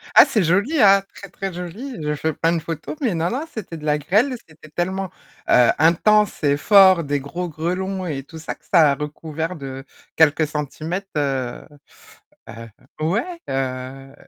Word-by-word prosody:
Ah, - - +10
c'est 235 -9 +1
joli, 205 - +2
hein, 195 -1 +6
très, 200 - -10
très 195 -2 -5
joli, 205 +10 -7
je 150 0 -1
fais 160 +2 -2
plein 165 +3 +1
de 165 - 0
photos, 160 - -6
mais 235 -8 +1
non, 165 +1 0
non, 280 +6 -3
c'était 210 - -7
de 155 - -10
la 150 0 +2
grêle. 215 - +1
C'était 155 -1 -17
tellement, 185 +3 -3 0.4
heu, 125 -1 +6
intense 200 +5 +3
et 145 0 +3
fort, 190 -1 +6
des 145 0 -1
gros 145 +6 -5
grêlons 185 +4 -3
et 135 -4 -4
tout 160 +3 -11
ça 160 - -5
que - - -34
ça 160 -6 +5
a 140 - 0
recouvert 160 +3 -5
de 135 -3 -7 0.3
quelques 155 0 +4
centimètres, 155 +6 -4
heu, 135 -4 -2 0.8
heu, 115 +1 -9 0.3
ouais, 230 - -1
heu 135 0 -4
165 Hz, 175 wpm, -21 LUFS, 145-195 Hz, 0.8 s, Ah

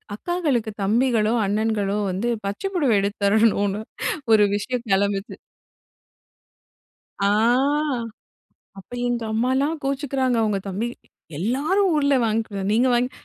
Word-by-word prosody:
அக்காகளுக்கு 280 -8 -1
தம்பிகளோ, 225 +1 +2
அண்ணன்களோ 210 -1 0
வந்து 195 +6 -2 0.2
பச்ச 200 +1 -4
புடவை 285 -10 +2
எடுத்து 200 +1 -2
தரணும்ன்னு 215 +1 +3
ஒண்ணு 200 +2 -2 0.5
ஒரு 210 -1 +6
விஷயம் 245 +3 -3
கெளம்புச்சு. 200 +1 0 1.8
ஆ. 200 - +1 1.5
அப்ப 190 - -14 0.2
எங்க 240 -1 -1
அம்மால்லாம் 260 +7 +1
கோச்சுக்குறாங்க 270 -2 0
அவங்க 210 -2 0
தம்பி 200 +5 -2 0.5
எல்லாரும் 300 - +1
ஊர்ல 280 -2 +2
வாங்கிக்கு 220 -3 -2
நீங்க 240 +4 +3
வாங்கி, 250 +2 +1
225 Hz, 110 wpm, -23 LUFS, 205-260 Hz, 1.8 s, ஒரு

